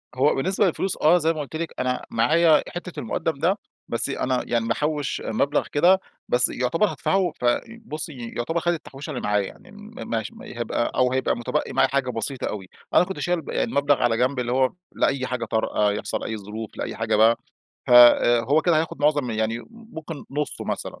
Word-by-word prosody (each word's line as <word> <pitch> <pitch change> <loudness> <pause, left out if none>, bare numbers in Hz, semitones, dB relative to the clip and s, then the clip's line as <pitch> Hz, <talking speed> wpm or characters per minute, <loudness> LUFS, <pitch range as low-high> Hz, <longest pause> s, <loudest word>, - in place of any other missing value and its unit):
هو 135 +3 +3
بالنسبة 190 +9 +1
للفلوس 190 +1 0
آه، 160 +4 +6
زي 165 -1 +1
ما 155 - -4
قُلت 145 +2 -8
لِك، 165 +1 -4
أنا 125 0 -1
معايا 155 +7 +4
حتّة 175 0 -7
المقدم 140 +6 -2
ده، 185 +7 +2 0.3
بس 115 - +1
أنا 130 -2 -1
يعني 115 -1 0
محوش 150 +4 -1
مبلغ 140 +6 0
كده، 180 +6 +5 0.3
بس 125 +1 +5
يعتبر 125 - +1
هادفعه 190 -2 0
ف - - -1 0.4
بصي 150 - -6
يعتبر 165 +8 -1
خد 175 +1 +1
التحويشة 150 -2 -8
اللي 130 -5 -4
معايا، 105 -1 +1
يعني - - -14
م 210 +1 -13 0.2
مش 110 -2 -2
هيبقى 120 0 -3
أو 125 -1 +3
هيبقى 130 - +1
متبقي 120 - -2
معايا - - +3
حاجة 135 -2 0
بسيطة 125 +2 -3
أوي. 95 -3 -6 0.2
أنا - - +6
كنت 190 +1 -6
شايل 175 -1 0
يعني - - -1
مبلغ 140 0 +2
على 115 -2 +2
جنب 125 +2 +1
اللي 120 -1 -2
هو 130 +1 +2 0.2
لأي 130 -2 0
حاجة 125 -2 -3
طارئة، 105 -2 +1
يحصل - - -3
أي 110 - -3
ظروف، 105 +2 -8
لأي - - -4
حاجة - - 0
بقى. 110 +2 +5 0.5
ف - - -5
آآ 120 -1 +7
هو 145 +7 +2
كده 170 -3 +3
هياخد 155 -3 -3
معظم 145 -4 +2
يعني 110 +1 -1
م - - -11
ممكن 170 -10 -9
نصه 145 +2 -3
مثلًا، - - -4
135 Hz, 195 wpm, -24 LUFS, 120-160 Hz, 0.5 s, آآ